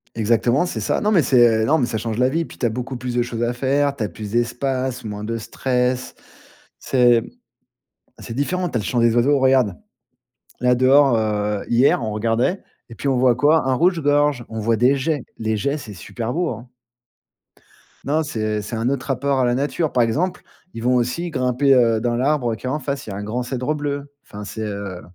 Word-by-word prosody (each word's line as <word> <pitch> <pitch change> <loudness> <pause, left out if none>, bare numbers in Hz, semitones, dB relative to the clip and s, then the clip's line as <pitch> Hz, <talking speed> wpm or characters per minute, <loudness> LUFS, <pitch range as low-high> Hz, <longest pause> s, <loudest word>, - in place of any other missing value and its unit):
Exactement, 120 +6 +2
c'est 180 - -4
ça. - - -1
Non, 210 - +1
mais 180 - +5
c'est 120 -4 +4
non, 155 +7 +3
mais 130 - +1
ça 115 - -3
change 110 0 -4
la 125 +1 +3
vie. 165 +4 -1
Puis, - - -14
tu - - -2
as - - +3
beaucoup 125 +3 -5
plus 125 0 -5
de 120 - +2
choses 120 -1 -3
à 120 - 0
faire. 140 +3 0
Tu 120 - -3
as 105 - -2
plus 105 -2 -8
d'espace, 125 +2 -1
moins 105 -1 -6
de 115 +1 -3
stress. 125 +2 -2 0.6
C'est 120 -3 +3 1.0
c'est 115 - -8
différent. 180 +7 -1
Tu 125 - -5
as 115 - +1
le - - -6
chant 120 - 0
des 115 -1 +3
oiseaux. 140 +4 +3
Regarde, 130 -8 +3 0.8
là, 125 0 +3
dehors, 130 0 +5
heu, 105 -2 -1
hier 125 +2 +3
on 110 -2 -3
regardait, 115 - 0 0.3
et 115 - -11
puis, 140 - -6
on 135 - +2
voit 125 -1 +4
quoi? 145 +1 +3
Un 130 - +2
rouge 175 +4 +2
gorge, 145 -3 +2
on 110 - -6
voit 115 +1 +1
des 125 +5 +3
geais, 145 0 -1 0.2
les 110 -1 -1
geais 140 +8 -1
c'est 110 -8 -9
super 115 +6 -5
beau, 175 +3 -1
hein! 120 +1 -8 1.4
Non, 150 +3 +1
c'est 110 -7 -2
c'est 105 +3 -6
un 115 +2 0
autre 135 -2 -3
rapport 135 0 0
à 130 - +3
la 120 0 +1
nature. 150 +3 -1
Par 125 - +3
exemple, 170 +11 -1 0.3
ils 115 - -7
vont 125 +1 +3
aussi 125 +9 -1
grimper, 130 +1 +2
heu, 115 -3 +4
dans 120 +1 -1
l'arbre 125 -2 0
qui 110 - -11
est - - -1
en 150 +4 -1
face, 140 -2 -4
il - - -6
y - - -5
a - - -6
un 105 - -5
grand 120 +4 -3
cèdre 130 +3 -2
bleu. 145 -1 -4
Enfin 105 +1 -9
c'est 110 +2 -7
heu 100 -4 -5
125 Hz, 225 wpm, -21 LUFS, 115-140 Hz, 1.4 s, mais